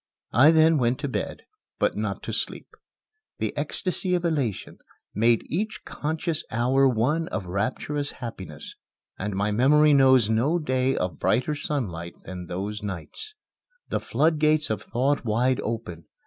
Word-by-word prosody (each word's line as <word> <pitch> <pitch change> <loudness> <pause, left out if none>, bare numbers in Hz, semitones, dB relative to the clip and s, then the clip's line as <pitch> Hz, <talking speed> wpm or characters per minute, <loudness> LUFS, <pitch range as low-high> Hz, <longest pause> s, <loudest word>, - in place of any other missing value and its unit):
I 130 +7 +7
then 160 -1 +5
went 120 0 +1
to 145 - -1
bed, 130 - -4 0.3
but - - +1
not - - -3
to - - -4
sleep. - - -3 0.7
The - - -2
ecstasy 185 0 -1
of 175 -1 -1
elation 140 - -2 0.3
made 115 +2 +3
each 215 +7 -3
conscious 160 +1 -2
hour 130 +4 +3
one 140 +8 +1
of 105 -3 -4
rapturous 125 +10 -2
happiness, 95 - -8 0.5
and 105 0 -3
my 100 +2 0
memory 145 +7 +5
knows 130 -4 +6
no 120 +10 +2
day 130 -4 0
of 90 -5 -2
brighter 130 +5 +1
sunlight 100 - -3
than 90 0 -7
those 100 +5 -4
nights. 105 - -5 0.5
The - - 0
floodgates 155 -3 +2
of 110 - -2
thought 135 +4 0
wide 120 +3 +1
open. 110 -8 -5
130 Hz, 145 wpm, -25 LUFS, 105-150 Hz, 0.7 s, I